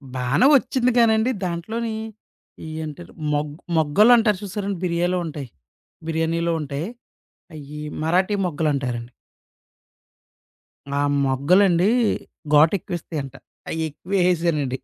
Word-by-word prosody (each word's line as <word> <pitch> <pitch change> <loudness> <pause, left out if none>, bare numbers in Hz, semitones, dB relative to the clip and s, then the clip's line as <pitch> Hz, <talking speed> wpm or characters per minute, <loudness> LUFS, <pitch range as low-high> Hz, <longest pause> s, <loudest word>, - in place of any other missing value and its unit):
బానే 130 - +2
వచ్చిందిగానండి, 245 -2 +3
దాంట్లోని 220 +7 -3 0.9
ఏంటారు 155 +3 -9 0.2
మొగ్ 145 0 -1 0.2
మొగ్గలు 160 +10 +5
అంటారు 215 -4 +2
చూసారండి? 200 0 -3
బిర్యాలో 175 +1 0
ఉంటాయి. 145 -5 -6 0.6
బిర్యానీలో 165 +1 0
ఉంటాయి. 145 +4 -4 0.7
అయ్యి 150 0 -9 0.2
మరాఠీ 185 +5 +2
మొగ్గలు 155 -2 -1
అంటారండి. 125 -3 -3 1.9
ఆ - - +2 0.2
మొగ్గలండి 175 +8 +3 0.7
ఘోటెక్కువేస్తాయంట. 155 -4 +1 0.4
అయెక్కువేసేసానండి. 160 -3 0
170 Hz, 80 wpm, -22 LUFS, 145-195 Hz, 1.9 s, మొగ్గలు